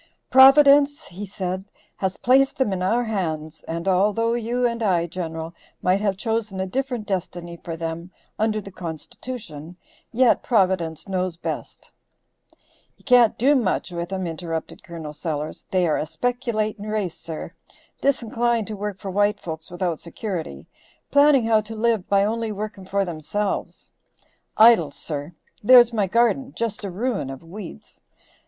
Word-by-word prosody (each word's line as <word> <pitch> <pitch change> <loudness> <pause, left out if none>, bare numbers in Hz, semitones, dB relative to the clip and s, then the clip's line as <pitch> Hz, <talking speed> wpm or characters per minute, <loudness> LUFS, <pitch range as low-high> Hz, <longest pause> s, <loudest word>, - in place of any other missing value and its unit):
"Providence," 280 +2 +7
he 195 +3 -7
said, 190 -1 -4 0.3
"has 190 -1 -2
placed 270 +2 +3
them 240 -7 +1
in 185 - -3
our 230 +7 +2
hands, 160 -8 -3
and 165 +2 -4
although 210 +5 +2
you 240 +1 -1
and 235 -1 -1
I, 180 -6 +2
General, 165 -1 -5 0.3
might 185 +2 +2
have 200 -3 0
chosen 220 -2 -2
a 190 - 0
different 250 +1 -3
destiny 175 -3 -4
for 165 -1 -5
them, 165 +1 -5 0.3
under 215 0 +1
the 195 -1 -10
Constitution, 175 - -8 0.3
yet 245 0 +4
Providence 185 - +1
knows 185 -2 -2
best." - - -6 1.1
"You - - -26
can't 245 -4 +5
do 275 +5 +4
much 190 -7 0
with 170 +1 -5
'em," 190 -1 -2
interrupted 165 -1 -5
Col. 160 -3 -8
Sellers. 155 -1 -5
"They 185 -2 +2
are 155 - +1
a 155 - -2
speculating 225 - -2
race, 210 -5 -2
sir, 160 -2 -7 0.5
disinclined 235 -4 +1
to 215 - -4
work 205 -1 -4
for 195 0 -6
white 205 +2 +2
folks 160 -1 -7
without 175 -2 -2
security, 170 - -6 0.5
planning 285 -4 +5
how 220 -1 +4
to 220 +1 -9
live 220 -3 0
by 200 0 +4
only 225 +1 -1
working 210 -2 -6
for 195 +1 0
themselves. 175 +5 -4 0.7
Idle, 220 -8 +7
sir, 145 +2 -6 0.3
there's 240 +1 +7
my 210 -3 +1
garden 240 +6 +1
just 225 -2 -3
a 200 - -3
ruin 200 - -2
of 135 +2 -8
weeds. 175 - -10
200 Hz, 150 wpm, -23 LUFS, 170-230 Hz, 1.1 s, Providence